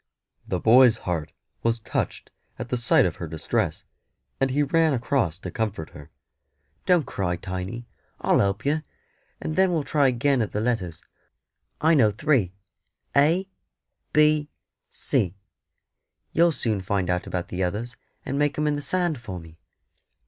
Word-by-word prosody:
The - - -1
boy's 120 0 +6
heart 85 -4 -2 0.3
was 115 0 +1
touched - - -3 0.3
at - - -6
the - - 0
sight 120 -3 +4
of 85 - -2
her 85 - -5
distress, 80 0 -2 0.5
and 135 - +2
he 145 +3 +2
ran 160 +2 +3
across 120 - 0
to 95 -2 -7
comfort 105 -7 -3
her. 75 -1 -12 0.8
"Don't 175 -5 +4
cry, 90 -5 -2
Tiny; 95 +7 -5 0.3
I'll - - +3
help 100 +3 0
yer, 155 +2 +1 0.6
and 155 - -4
then 190 0 +4
we'll 160 -4 0
try 145 -1 +2
agin 130 +1 +2
at 110 - -2
the 105 - 0
letters. 105 -8 -2 0.8
I 160 +2 +4
know 125 -9 +5
three 110 - +1 0.6
A 165 +7 +3 0.6
B 150 -1 +3 0.4
C: 90 0 0 1.0
you'll 170 +1 +4
soon 110 -9 -1
find 95 0 -1
out 90 0 -1
about 90 -1 -3
the 90 - -3
others, 110 +7 -3 0.3
and 140 +2 -2
make 145 -1 +1
'em 150 - +1
in 150 -1 +1
the 145 - -3
sand 175 -1 0
for 100 -6 -7
me." 80 -1 -15
120 Hz, 155 wpm, -25 LUFS, 95-145 Hz, 1.0 s, boy's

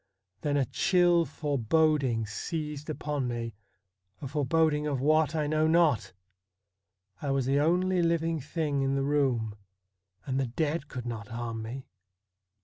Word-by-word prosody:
Then 145 -1 0
a 135 - +2
chill 175 - +3
foreboding 145 -4 +1
seized 150 +6 -5
upon 145 -3 -2
me 115 -1 -3 0.3
— 95 0 -48
a - - -3
foreboding 150 +2 +1
of 145 -2 0
wbat 155 +3 +2
I 155 -1 +1
know 155 +1 +2
not. 160 - +3 1.1
I 145 - -2
was 135 -2 +1
the 135 +2 +2
only 180 +4 +2
living 165 -1 +1
thing 150 0 -2
in 135 0 +1
the 135 - 0
room, 135 -7 +1 0.7
and 135 0 -1
the 135 - 0
dead 150 +4 -2
could 125 -3 -6
not 110 -4 -5
harm 115 -1 -4
me. 125 +4 -6
145 Hz, 145 wpm, -29 LUFS, 125-155 Hz, 1.1 s, chill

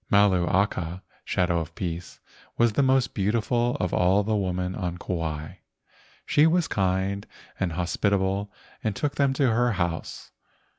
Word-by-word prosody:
Malu 100 -4 +4
aka 90 -2 0 0.2
(shadow 85 -2 +1
of 85 0 -6
peace) 90 -1 -5 0.4
was 120 -2 +3
the 140 - +2
most 130 -1 +2
beautiful 115 +4 +1
of 90 - -1
all 95 +3 +3
the 110 +1 0
women 90 -2 -1
on 90 -3 -3
Kauai. 80 -1 -4 0.7
She 150 +2 +4
was 170 0 +2
kind 95 +1 -1 0.3
and 90 -3 -1
hospitable 95 +3 0 0.3
and 110 -4 -1
took 145 +4 -1
them 140 -2 +2
to 135 -2 +2
her 120 +1 +2
house. 85 -3 -3
95 Hz, 145 wpm, -26 LUFS, 90-110 Hz, 0.7 s, Malu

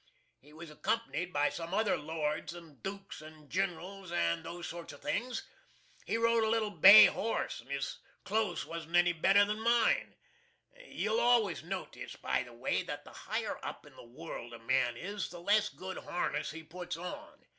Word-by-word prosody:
He 145 - -19
was 160 +1 -10
accompanied 180 0 -2
by 145 -2 +2
some 170 +2 -4
other 215 0 +2
lords 155 +1 -3
and 165 -5 -13
dukes 195 -3 -6
and 155 -1 -14
generals 185 0 -3
and 170 -1 +1
those 170 +1 -6
sort 170 0 -7
of - - -14
things. 245 +2 -2 0.6
He 225 - +1
rode 230 0 +3
a 220 - +2
little 220 -2 +1
bay 200 +1 +10
horse, 225 - -1
and - - -21
his 140 0 -3 0.2
close 210 -3 0
wasn't 165 0 -5
any 175 0 +5
better 195 +5 +5
than 210 +1 -2
mine. 235 0 +2 0.7
You'll 220 +2 0
always 235 -9 +3
notiss, 180 +3 -6
by - - 0
the 120 -2 -9
way, 120 - -1
that - - -6
the - - -14
higher - - -4
up - - -6
in - - -16
the - - -12
world 120 -1 -8
a - - -11
man 120 -1 +2
is, 200 +5 -4
the 175 - -9
less 210 +4 +3
good 190 0 -7
harness 175 - -2
he 165 +1 -8
puts 175 +2 -6
on. 180 +1 -8
175 Hz, 180 wpm, -32 LUFS, 160-205 Hz, 0.7 s, bay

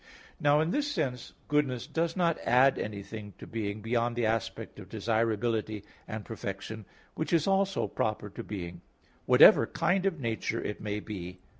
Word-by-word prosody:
Now 145 +1 +4
in 160 +2 0
this 290 +3 0
sense, 130 - -2
goodness 140 -5 +1
does 165 +1 -1
not 170 -3 +2
add 130 +3 +5
anything 105 0 -6
to - - -9
being 105 -2 -4
beyond 120 +1 0
the 120 -1 +1
aspect 110 0 -2
of - - -11
desirability 110 -1 0 0.2
and 110 -1 -5
perfection, 110 0 -6 0.3
which 160 - -3
is 165 -3 +3
also 195 0 +2
proper 105 -1 -2
to - - -7
being, 90 -4 -6 0.5
whatever - - +8
kind 190 +1 +1
of 170 -5 -1
nature 115 -1 -2
it 105 - -4
may 105 0 -3
be. 95 -4 -7
115 Hz, 160 wpm, -30 LUFS, 105-150 Hz, 0.5 s, whatever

